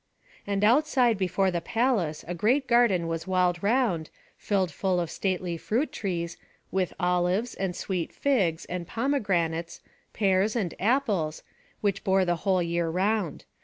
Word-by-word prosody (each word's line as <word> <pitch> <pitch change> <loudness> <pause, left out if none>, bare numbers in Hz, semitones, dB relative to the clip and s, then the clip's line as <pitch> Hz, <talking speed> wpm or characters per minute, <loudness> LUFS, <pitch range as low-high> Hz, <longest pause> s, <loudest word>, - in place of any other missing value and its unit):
And 200 0 0
outside 245 0 +4
before 190 0 +1
the 170 -1 -2
palace 215 -8 0
a 175 - -3
great 240 - +2
garden 235 -9 +3
was 165 +2 -3
walled 180 -2 +1
round, 205 -7 +1 0.3
filled 190 -4 0
full 185 +4 0
of 170 -2 -2
stately 180 -3 -2
fruit 240 - -1
trees, 170 -4 -3 0.3
with 185 -2 0
olives 180 +5 +1
and 190 -2 -3
sweet 180 -4 -3
figs, 195 - 0
and 175 -1 -5
pomegranates, 185 - -1 0.3
pears, 195 +1 +1
and 195 -8 -1
apples, 200 - 0 0.4
which 200 -2 0
bore 190 -2 +3
the 175 -1 +1
whole 185 0 +1
year 170 0 -1
round. 190 0 -1
190 Hz, 145 wpm, -27 LUFS, 175-220 Hz, 0.4 s, outside